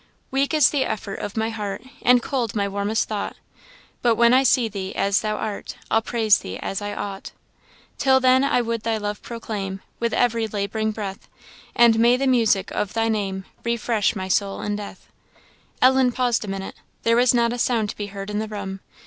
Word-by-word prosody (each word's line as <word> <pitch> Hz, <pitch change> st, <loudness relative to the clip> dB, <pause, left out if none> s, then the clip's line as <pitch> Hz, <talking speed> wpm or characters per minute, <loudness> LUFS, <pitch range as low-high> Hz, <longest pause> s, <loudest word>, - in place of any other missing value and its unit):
Weak 275 Hz, +1 st, +1 dB
is 305 Hz, -4 st, +5 dB
the 285 Hz, -3 st, +1 dB
effort 210 Hz, -4 st, -4 dB
of 205 Hz, -, -6 dB
my 220 Hz, +1 st, 0 dB
heart, 210 Hz, -1 st, -5 dB, 0.2 s
And 245 Hz, -1 st, +5 dB
cold 240 Hz, -6 st, -2 dB
my 200 Hz, -1 st, +1 dB
warmest 200 Hz, +2 st, -1 dB
thought 210 Hz, -2 st, -3 dB, 0.7 s
But 235 Hz, -2 st, +3 dB
when 235 Hz, +1 st, +5 dB
I 260 Hz, -, +6 dB
see 255 Hz, -2 st, +3 dB
thee 195 Hz, -3 st, -6 dB
as 200 Hz, 0 st, +2 dB
thou 215 Hz, -1 st, -1 dB
art, 210 Hz, -1 st, -5 dB, 0.2 s
I'll 225 Hz, -, +4 dB
praise 220 Hz, -2 st, +3 dB
thee 95 Hz, +1 st, -6 dB
as 195 Hz, -, -4 dB
I 205 Hz, 0 st, -4 dB
ought. 195 Hz, -2 st, -6 dB, 0.7 s
Till 265 Hz, -1 st, +4 dB
then, 260 Hz, +1 st, +4 dB
I 275 Hz, -3 st, +2 dB
would 230 Hz, -1 st, -2 dB
thy 225 Hz, 0 st, 0 dB
love 210 Hz, 0 st, -4 dB
proclaim 205 Hz, -5 st, -5 dB, 0.2 s
With 235 Hz, -1 st, 0 dB
every 230 Hz, -2 st, +1 dB
lab'ring 215 Hz, +1 st, -2 dB
breath; 205 Hz, -3 st, -6 dB, 0.5 s
And 235 Hz, -1 st, +5 dB
may 240 Hz, +2 st, +5 dB
the 275 Hz, -, -1 dB
music 225 Hz, -7 st, +2 dB
of 205 Hz, -, -2 dB
thy 225 Hz, 0 st, +1 dB
name 195 Hz, -3 st, -2 dB, 0.2 s
Refresh 235 Hz, -3 st, 0 dB
my 190 Hz, -2 st, -4 dB
soul 195 Hz, +1 st, 0 dB
in 205 Hz, 0 st, -1 dB
death." 205 Hz, -1 st, -8 dB, 0.8 s
Ellen 260 Hz, -1 st, +5 dB
paused 245 Hz, -2 st, 0 dB
a -, -, -7 dB
minute. 195 Hz, 0 st, -5 dB, 0.3 s
There 230 Hz, 0 st, +3 dB
was 250 Hz, 0 st, +4 dB
not 235 Hz, 0 st, +2 dB
a 245 Hz, -, -5 dB
sound 225 Hz, -4 st, +1 dB
to -, -, -13 dB
be 205 Hz, -, -5 dB
heard 195 Hz, 0 st, -7 dB
in 210 Hz, -, -1 dB
the 220 Hz, -, -3 dB
room. 200 Hz, -2 st, -6 dB
220 Hz, 200 wpm, -23 LUFS, 200-240 Hz, 0.8 s, I